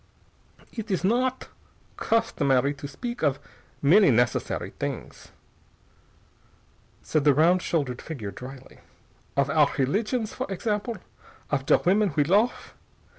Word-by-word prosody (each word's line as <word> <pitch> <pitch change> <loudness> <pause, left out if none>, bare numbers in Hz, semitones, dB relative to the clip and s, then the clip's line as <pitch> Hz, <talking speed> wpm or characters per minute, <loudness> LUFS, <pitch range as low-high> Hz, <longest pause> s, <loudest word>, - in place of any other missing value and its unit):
"Idt 225 -1 -5
is 185 -3 -1
not 250 +6 0 0.5
customary 140 - +1
to 145 0 -8
speak 240 - -6
of 140 -3 +2 0.5
many 190 +7 +6
necessary 120 0 0
things," - - -5 1.8
said 155 -2 0
the 145 -2 +5
round 175 +5 +4
shouldered 140 -9 -2
figure 120 -12 -6
dryly. 130 +3 -11 0.6
"Of 140 0 +2
our 150 -2 +4
religions, 210 - 0
for - - -5
example. 210 +3 -2 0.5
Of 135 -2 -1
der - - +6
women 195 -1 +3
we 150 - +4
lofe. 205 +10 +1
160 Hz, 120 wpm, -26 LUFS, 140-210 Hz, 1.8 s, many